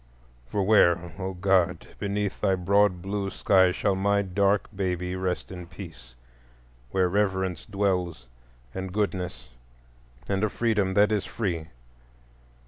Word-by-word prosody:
—for 100 +10 -1
where, 85 -4 +4
O 95 0 -3
God! 90 -2 +2
beneath 100 -1 -2
thy 95 - +3
broad 95 0 +2
blue 100 0 -2
sky 95 -1 +4
shall 100 +2 0
my 100 +1 +2
dark 100 +1 +1
baby 90 -2 -2
rest 95 -1 -3
in 90 -2 -8
peace,—where - - -6
Reverence 95 -2 0
dwells, 90 - -1 0.5
and 95 0 -5
Goodness, 90 - -2 0.8
and 100 0 0
a 110 - +2
Freedom 105 -4 0
that 105 +1 +5
is 105 -2 0
free? 85 -8 -3
95 Hz, 125 wpm, -26 LUFS, 90-100 Hz, 0.8 s, that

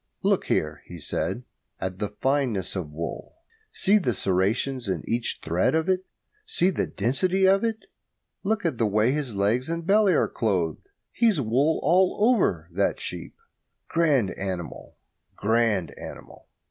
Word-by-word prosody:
"Look - - +2
here," - - -1
he 85 - -9
said, 95 +9 -3 0.4
"at 95 0 -4
the 105 - -2
fineness 125 -5 -1
of 90 -6 -3
the 75 - -15
wool. 85 - -5 0.4
See 210 +2 +3
the 125 - -1
serrations 105 +8 0
in 95 - -2
each 120 0 -1
thread 85 - +1
of 160 +2 +1
it. 185 0 0 0.4
See 190 - +2
the - - -1
density 180 - +1
of 195 +3 +4
it. 225 -1 -2 0.6
Look 205 -1 -1
at 155 -8 -1
the 115 - +3
way 105 +4 +2
his 140 -6 -3
legs 110 +8 +1
and 165 0 -3
belly 200 -1 +4
are - - +3
clothed 90 - -1 0.2
he's 225 -8 +2
wool 135 +6 +2
all 185 +1 +3
over, 245 - +1
that - - 0
sheep. - - -6 0.5
Grand 145 - +2
animal, 95 -3 -6 0.4
grand 105 -6 +1
animal!" - - -10
125 Hz, 155 wpm, -25 LUFS, -, 0.6 s, of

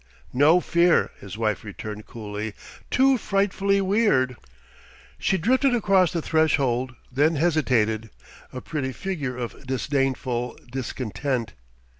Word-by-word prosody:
"No 150 +7 +5
fear," 170 0 +3
his 100 +1 -9
wife 110 -3 -1
returned 105 0 -7
coolly. 105 -1 -6 0.3
"Too 265 -1 +4
frightfully 200 -1 +1
weird...." 190 - +2 0.8
She 190 - +1
drifted 255 - +2
across 195 -6 +3
the 165 -3 -2
threshold, 130 -6 +1 0.2
then 150 +5 +2
hesitated, 125 -9 +1 0.4
a 125 - -6
pretty 135 -4 -3
figure 145 -10 -4
of 125 +1 -6
disdainful 130 -2 -1
discontent. 130 -1 -3
135 Hz, 110 wpm, -24 LUFS, 120-180 Hz, 0.8 s, No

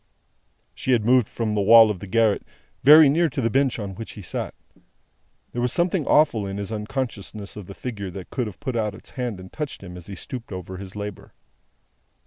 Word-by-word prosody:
She 130 - 0
had 110 -3 +2
moved 125 -1 +4
from 110 -2 -2
the 105 - +1
wall 110 +1 +8
of 95 - -5
the 100 - -8
garret, 110 +1 +2 0.4
very 150 +3 +9
near 165 +4 +3
to 135 - -4
the 115 -3 +1
bench 135 0 +2
on 100 -3 -5
which 115 +4 -8
he 105 - -10
sat. - - -4 1.0
There 120 - -3
was 125 0 +1
something 175 -2 0
awful 145 -10 +3
in 95 0 -4
his 100 +1 -4
unconsciousness 105 -2 -4
of 105 -4 -8
the 100 - -9
figure 105 -6 -5
that 90 0 -9
could 125 -4 -1
have 105 - -9
put 130 -4 -4
out 105 -3 -1
its - - -13
hand 120 -6 -4
and 95 0 -12
touched 150 -9 -5
him 90 -2 -9
as 90 -2 -11
he 100 - -7
stooped 120 +5 -8
over 95 0 -6
his 95 0 -9
labour. 105 -1 -7
110 Hz, 215 wpm, -24 LUFS, 100-125 Hz, 1.0 s, very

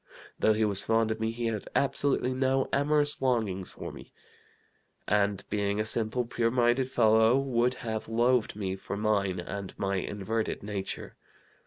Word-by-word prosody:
Though 110 - +4
he 110 +1 +1
was 100 -1 +1
fond 115 0 +2
of 110 - -3
me, 110 0 0
he 115 +1 -4
had 110 -3 -2
absolutely 140 -2 +1
no 130 +1 +1
amorous 145 +1 +2
longings 110 -8 0
for - - -7
me, - - -12 1.0
and 100 -1 +1
being 100 0 0
a 110 - 0
simple, 115 +2 +1
pure 115 0 0
minded 125 +2 +2
fellow, 110 0 +4
would 125 -2 +1
have 110 -1 -3
loathed 120 0 +2
me 95 -3 -3
for 100 +1 -6
mine 100 -3 0
and 95 +2 -6
my 100 0 -1
inverted 105 +4 -3
nature. 100 -2 -5
110 Hz, 160 wpm, -29 LUFS, 100-125 Hz, 1.0 s, Though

